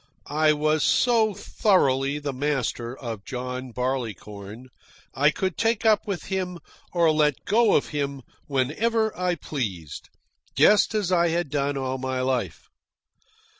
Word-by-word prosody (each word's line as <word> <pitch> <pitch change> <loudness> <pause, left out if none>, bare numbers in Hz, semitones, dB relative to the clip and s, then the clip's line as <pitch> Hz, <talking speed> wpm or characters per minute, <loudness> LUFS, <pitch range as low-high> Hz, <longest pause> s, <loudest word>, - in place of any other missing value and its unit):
I 155 +1 +2
was 155 +1 +1
so 225 -1 +3
thoroughly 140 - +1
the 145 -2 -4
master 130 -3 -2
of 115 -5 -6
John 125 +1 -5
Barleycorn 115 -3 -5 0.4
I 145 +2 +4
could 185 +3 -3
take 230 +1 +1
up 215 -1 +3
with 195 -4 -3
him 185 -2 -3 0.3
or 170 -2 +3
let 150 -3 +1
go 225 +1 +4
of - - +1
him 140 -3 -3 0.2
whenever 215 - 0
I 180 -1 0
pleased, 100 - -5 0.5
just 210 +1 +5
as 200 -4 0
I 170 -1 +3
had 170 -3 -1
done 140 -1 0
all 130 -1 -2
my 130 0 -2
life. 130 -1 -2
145 Hz, 135 wpm, -25 LUFS, 130-180 Hz, 0.5 s, just